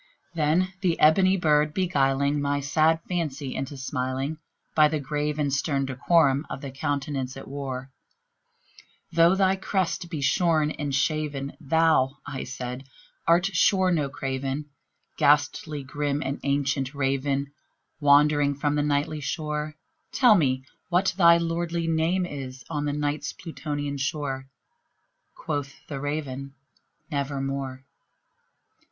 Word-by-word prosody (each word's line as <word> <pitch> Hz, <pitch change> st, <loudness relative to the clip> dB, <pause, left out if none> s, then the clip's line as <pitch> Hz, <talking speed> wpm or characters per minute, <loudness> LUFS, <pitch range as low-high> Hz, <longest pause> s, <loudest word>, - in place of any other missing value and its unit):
Then 170 Hz, +4 st, +1 dB
this 175 Hz, -4 st, +2 dB
ebony 185 Hz, +5 st, +5 dB
bird 150 Hz, -3 st, +2 dB
beguiling 140 Hz, -5 st, +1 dB
my 145 Hz, 0 st, 0 dB
sad 155 Hz, +3 st, +2 dB
fancy 150 Hz, -6 st, -3 dB
into 135 Hz, +1 st, -4 dB
smiling, 135 Hz, +3 st, -3 dB, 0.3 s
By 155 Hz, -1 st, +6 dB
the 155 Hz, 0 st, -1 dB
grave 150 Hz, +1 st, -2 dB
and 145 Hz, -3 st, 0 dB
stern 140 Hz, -1 st, 0 dB
decorum 140 Hz, +1 st, +3 dB
of -, -, -6 dB
the 140 Hz, -, -6 dB
countenance 135 Hz, -2 st, -3 dB
it -, -, -9 dB
wore, 135 Hz, -1 st, -5 dB, 1.2 s
"Though 170 Hz, +2 st, +5 dB
thy 195 Hz, 0 st, +3 dB
crest 185 Hz, -2 st, -1 dB
be 160 Hz, -4 st, -4 dB
shorn 155 Hz, +2 st, +2 dB
and 145 Hz, -3 st, -3 dB
shaven, 145 Hz, -2 st, -1 dB
thou," 155 Hz, -2 st, +3 dB
I 135 Hz, -2 st, -5 dB
said, 125 Hz, 0 st, -6 dB, 0.4 s
"art 170 Hz, +2 st, +5 dB
sure 190 Hz, 0 st, +3 dB
no 150 Hz, -5 st, +1 dB
craven, 135 Hz, +1 st, -4 dB, 0.5 s
Ghastly 145 Hz, 0 st, +2 dB
grim 145 Hz, +2 st, -2 dB
and 135 Hz, +1 st, -2 dB
ancient 140 Hz, -1 st, 0 dB
Raven 140 Hz, 0 st, 0 dB, 0.5 s
wandering 145 Hz, 0 st, +4 dB
from 145 Hz, +1 st, 0 dB
the 150 Hz, -, +1 dB
Nightly 145 Hz, +1 st, 0 dB
shore 150 Hz, 0 st, -3 dB, 0.4 s
Tell 245 Hz, -4 st, +6 dB
me 130 Hz, -8 st, +1 dB, 0.2 s
what 185 Hz, +2 st, +2 dB
thy 170 Hz, -2 st, +7 dB
lordly 170 Hz, 0 st, -1 dB
name 165 Hz, +3 st, +1 dB
is 135 Hz, -5 st, -7 dB
on 150 Hz, -2 st, -1 dB
the 145 Hz, -, 0 dB
Night's 145 Hz, 0 st, -2 dB
Plutonian 145 Hz, -3 st, -5 dB
shore!" 135 Hz, -2 st, -2 dB, 0.9 s
Quoth 145 Hz, -2 st, -4 dB
the 140 Hz, -3 st, -5 dB
Raven, 140 Hz, -2 st, -4 dB, 0.6 s
"Nevermore." 135 Hz, -2 st, -3 dB
145 Hz, 125 wpm, -26 LUFS, 135-160 Hz, 1.2 s, thy